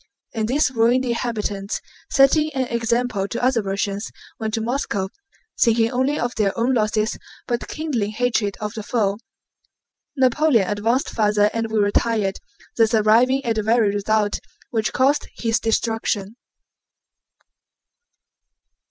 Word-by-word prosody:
And 220 -2 -1
these 270 +2 +2
ruined 245 +2 +2
inhabitants, 215 -4 -2 0.3
setting 300 +3 +4
an 260 -1 +1
example 235 -3 0
to 235 - -4
other 250 -2 +3
Russians, 200 +1 -3 0.3
went 220 0 -2
to - - -1
Moscow 225 -5 -2 0.5
thinking 230 -1 +3
only 260 +4 0
of 240 +1 -1
their 205 -1 0
own 240 +3 +1
losses 215 -1 0 0.3
but 240 -1 -2
kindling 275 -10 -2
hatred 220 -2 -1
of 210 -1 -4
the 225 - -5
foe. 205 -2 -1 1.0
Napoleon 260 -4 +3
advanced 225 +6 0
farther 210 -1 +2
and 225 -1 -2
we 220 - 0
retired, 205 -1 +1 0.4
thus 225 0 +4
arriving 240 +5 +3
at 225 -2 0
the - - +2
very 220 -1 +2
result 205 0 0 0.3
which 225 0 0
caused 275 +3 +2
his 230 -1 0
destruction. 225 -2 -1
225 Hz, 130 wpm, -22 LUFS, 210-245 Hz, 1.0 s, setting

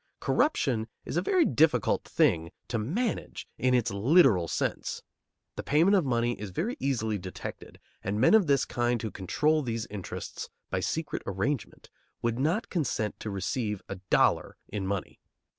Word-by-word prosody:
Corruption 125 - +1 0.2
is - - -5
a 175 - +2
very 350 - +3
difficult 150 - +3
thing 80 0 +2 0.2
to 115 - -1
manage 195 - -2
in 125 0 +3
its 120 -5 +1
literal 110 - +4
sense. 70 - -2 0.5
The - - -2
payment 165 +8 +4
of 185 - +3
money 120 -2 +1
is 105 - -4
very 195 - -2
easily 110 -6 0
detected, 95 0 -8 0.2
and 100 +2 -1
men 130 - +5
of 215 -6 +6
this 140 -2 +3
kind 120 0 0
who 110 -1 -4
control 150 - +1
these 115 -4 -3
interests 100 -3 -6 0.2
by 95 - 0
secret 160 - -2
arrangement 105 +7 -3 0.3
would 120 +1 0
not 165 +11 0
consent 125 - -1
to 110 - -5
receive 105 +1 -2
a 95 - -5
dollar - - +3
in 100 -2 -4
money. 100 -1 -3
120 Hz, 160 wpm, -29 LUFS, 105-155 Hz, 0.5 s, of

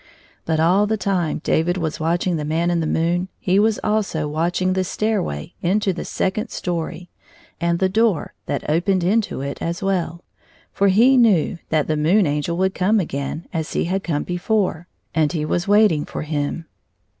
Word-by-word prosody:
But 160 -1 0
all 185 +6 +3
the 220 +1 0
time 185 -6 -1
David 175 +3 +1
was 160 -3 -3
watching 170 +2 0
the 155 - -2
Man 165 +3 0
in 170 - +1
the 160 - -1
moon 170 +3 0
he 185 +2 +2
was 220 0 +2
also 210 -8 0
watching 175 +4 0
the 185 0 +1
stairway 190 - -2
into 195 +2 +1
the 175 - -5
second 215 +4 -2
story 175 0 -4 0.5
and 170 0 +1
the 190 - +2
door 215 -3 +1
that 145 - -3
opened 175 +4 +1
into 205 -4 0
it 140 +1 -5
as 170 +3 -3
well; 175 -3 -1 0.5
for 200 - +2
he 235 +8 +5
knew 195 -7 +3
that 155 -2 +2
the 155 - 0
Moon 175 +7 +3
Angel 150 +3 -1
would 190 +1 +1
come 210 +4 +2
again 155 -1 -4
as 160 -2 -3
he - - +1
had 190 +3 -1
come 150 -4 -1
before, 180 -1 -1 0.3
and 155 0 +1
he 155 -3 -1
was 175 +5 -1
waiting 205 -7 +4
for - - -5
him. 150 +1 -3
175 Hz, 180 wpm, -21 LUFS, 160-195 Hz, 0.5 s, he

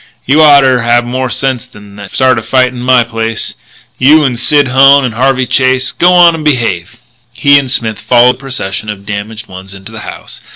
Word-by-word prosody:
"You 145 +4 +2
oughter 140 -4 +4
have 120 +1 +1
more 130 +1 -4
sense 125 +1 -3
than 105 -5 -16
to 100 -1 -10
start 130 0 +1
a - - -7
fight 125 +2 0
in 125 -1 -10
my 125 -1 +2
place 115 -1 -4 0.5
you 150 +4 +4
and 125 -4 -2
Sid 145 -1 +2
Hone 135 +2 +4
and 120 - -4
Harvey 130 +2 0
Chase. 130 0 0
G'wan 175 0 +4
in 165 - -3
and 155 - -8
behave." 120 - -2 0.4
He 140 +2 +3
and 135 -2 -6
Smith 115 -4 -3
followed 125 +1 +2
the - - -26
procession 110 -7 -6
of 100 -1 -8
damaged 105 +2 -7
ones 95 0 -12
into 95 +3 -12
the 110 - -10
house. - - -11
125 Hz, 205 wpm, -10 LUFS, 110-135 Hz, 0.5 s, oughter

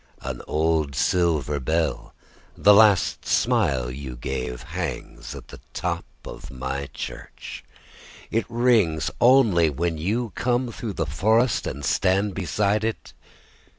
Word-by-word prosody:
An - - -5
old 80 -3 0
silver 75 0 +1
bell, 80 +4 -1 0.4
the 105 - +6
last 105 -4 +4
smile 80 - +1
you 65 -1 -7
gave, 65 -1 -4
Hangs - - -6
at - - -11
the - - -11 0.2
top 85 -1 -2 0.2
of - - -9
my 65 +1 -4
church.It 115 - -7
rings 115 -10 +2
only 115 -10 +5
when 80 +2 -2
you 110 +7 -1
come 125 0 0
through 110 -2 -5
the 80 - -2
forestAnd 105 - +1
stand 100 +2 +1
beside 100 +4 0
it. 115 0 -4
85 Hz, 115 wpm, -24 LUFS, 70-110 Hz, 0.4 s, the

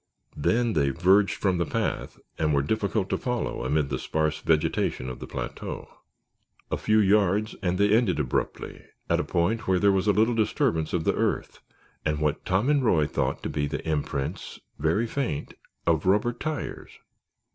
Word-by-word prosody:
Then 115 +10 +1
they 70 -4 +2
verged 95 +7 +3
from 95 -3 0
the 85 - +1
path - - -2 0.2
and 75 -2 +2
were 70 - +2
difficult 100 +3 0
to - - 0
follow 125 - -2
amid 70 +2 +1
the 65 -2 -2
sparse 80 -1 -1
vegetation 75 -4 0
of 65 - -7
the - - -7
plateau. - - -6 0.8
A - - +1
few 110 0 +2
yards 105 0 +3
and 90 -1 0
they 100 +1 +3
ended 110 -8 +3
abruptly 65 -5 -3 0.3
at - - +3
a - - +1
point 95 +6 0
where 95 -1 +3
there 100 +2 +4
was 95 +1 +1
a - - +6
little 110 +4 +3
disturbance 110 - 0
of 85 - 0
the - - +2
earth - - -1 0.4
and 75 -1 0
what 75 0 0
Tom 95 +6 +1
and 145 -2 +3
Roy 85 -10 +3
thought 70 - -2
to - - -2
be 75 -1 -1
the 70 +2 -5
imprints, 75 +2 -3 0.2
very 80 +10 +1
faint, 115 - -3 0.3
of 85 +1 +1
rubber 105 +5 +3
tires. 150 +4 -5
95 Hz, 180 wpm, -26 LUFS, 75-110 Hz, 0.8 s, a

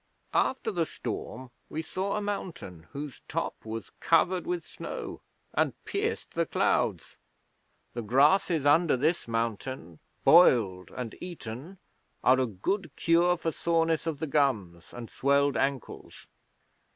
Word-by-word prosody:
'After 255 -4 +1
the 170 -5 0
storm 120 +1 -6 0.2
we 160 +1 -4
saw 190 +5 -2
a 210 - -2
mountain 170 - -5
whose 145 -1 -7
top - - -2
was 110 0 -6
covered 175 +2 +2
with 175 -2 -2
snow - - -7 0.3
and - - +1
pierced - - -2
the - - 0
clouds. - - 0 0.8
The 120 - -3
grasses 145 - +3
under 150 0 +4
this 155 +4 0
mountain, 115 -6 -3 0.2
boiled 110 - +5
and 125 -3 -6
eaten, 170 0 -7 0.5
are 130 +1 +5
a 130 - +2
good 170 - -2
cure 175 +1 +3
for 165 -1 -2
soreness 165 0 +1
of 160 -3 -1
the 160 - -2
gums 110 - 0
and 120 -1 -7
swelled 140 +2 +2
ankles. 135 -3 -3
145 Hz, 130 wpm, -29 LUFS, 115-170 Hz, 0.8 s, boiled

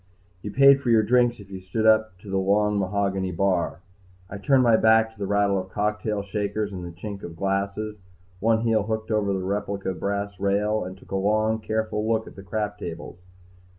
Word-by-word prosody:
You 105 - -5
paid 140 +3 +6
for 125 - -2
your 110 -2 +5
drinks 120 +1 +2
if 100 -1 -13
you 95 - -6
stood 95 +4 -3
up 110 -3 +3
to 100 - -11
the 95 - +1
long 105 +2 +2
mahogany 95 -1 -1
bar. 90 -2 0 0.5
I 100 - -6
turned 130 +5 +3
my 115 -2 +5
back 110 0 +4
to 110 - -23
the 100 - -2
rattle 100 -1 +2
of - - -7
cocktail 105 0 -2
shakers 105 +1 -3
and 90 -2 -7
chink 100 +1 -7
of 85 - -8
glasses, 100 +3 -2 0.4
one 110 +2 +2
heel 115 -2 +2
hooked 110 +2 -3
over 105 -2 +1
the 95 -1 -2
replica 100 0 -2
brass 100 0 -3
rail, 105 +2 +1
and 95 +1 -8
took - - -19
a - - -1
long 110 +3 +1
careful 110 0 -2
look 110 0 0
at - - -12
the 95 - -10
crap 105 +1 -3
tables. 85 -1 -7
105 Hz, 200 wpm, -25 LUFS, 95-110 Hz, 0.5 s, paid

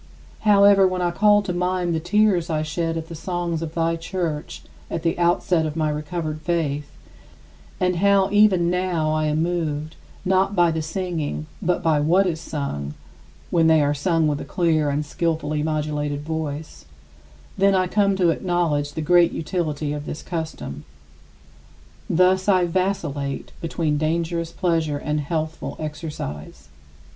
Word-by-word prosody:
However, 200 -2 +6
when 185 -1 -1
I 175 - +1
call 205 +2 +4
to 180 - -3
mind 180 -1 0
the 160 - 0
tears 180 0 +2
I 155 -1 0
shed 165 +1 -2
at 160 0 -5
the 170 - -8
songs 170 0 -3
of 165 -1 -5
thy 165 0 +1
Church 165 -2 -4 0.3
at 165 - -3
the 165 - +1
outset 175 -1 +2
of 150 - -5
my 155 -2 0
recovered 155 +1 -4
faith, 150 -4 -1 0.9
and 180 -1 +1
how 200 +1 +3
even 195 -5 +4
now 180 -4 0
I 155 0 +1
am 155 +1 +1
moved, 160 -3 -2 0.3
not 190 +2 +2
by 175 -2 +4
the 160 0 -2
singing 160 -2 -3 0.2
but 180 -2 0
by 160 -2 +3
what 175 +7 +3
is 165 -3 -2
sung 75 - -4 0.6
(when 165 -2 +4
they 160 -1 +5
are 145 0 +2
sung 160 +2 +1
with 145 -1 -1
a - - -4
clear 160 -4 +1
and 145 +2 -1
skillfully 155 -1 -1
modulated 150 -2 -2
voice), 155 - -5 0.7
I - - -14
then 190 -2 +3
come 200 -1 +2
to 180 -3 +3
acknowledge 165 -5 0
the 160 - -3
great 175 +2 +4
utility 155 -3 -2
of 150 0 -6
this 155 - -6
custom. 160 - -5 1.3
Thus 185 +3 +3
I 185 -2 +4
vacillate 170 -6 -2
between 160 -3 -1
dangerous 165 +1 -1
pleasure 165 -4 0
and 150 +1 -2
healthful 155 +2 -3
exercise. 150 - -6
165 Hz, 155 wpm, -23 LUFS, 150-180 Hz, 1.3 s, However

